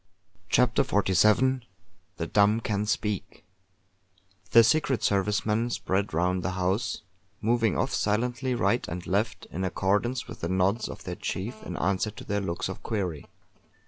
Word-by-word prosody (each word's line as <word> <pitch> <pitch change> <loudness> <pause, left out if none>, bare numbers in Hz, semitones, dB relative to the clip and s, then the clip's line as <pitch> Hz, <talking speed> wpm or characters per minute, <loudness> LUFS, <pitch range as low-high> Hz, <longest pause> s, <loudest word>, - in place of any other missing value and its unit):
CHAPTER 125 +2 +3
XLVII 105 +4 +3 0.6
THE 85 - -2
DUMB 105 +5 +3
CAN 105 0 -1
SPEAK 105 -1 -2 1.0
The 115 - +8
Secret 140 0 +2
Service 100 +1 +1
men 110 +3 +1
spread 100 -3 -1
round 90 +3 +1
the 95 - -2
house, 95 +5 -1 0.4
moving 115 -2 +1
off - - 0
silently 125 +4 0
right 120 0 +1
and 90 0 -5
left, 100 +1 -1
in 95 - -3
accordance 105 +7 0
with - - -9
the 85 - -2
nods 95 +5 +1
of - - -8
their - - -4
chief 110 +4 -4
in 90 - -6
answer 95 +3 0
to 105 - -10
their 100 0 -1
looks 85 -3 -2
of - - -7
query. 90 -9 -3
105 Hz, 150 wpm, -27 LUFS, 95-115 Hz, 1.0 s, The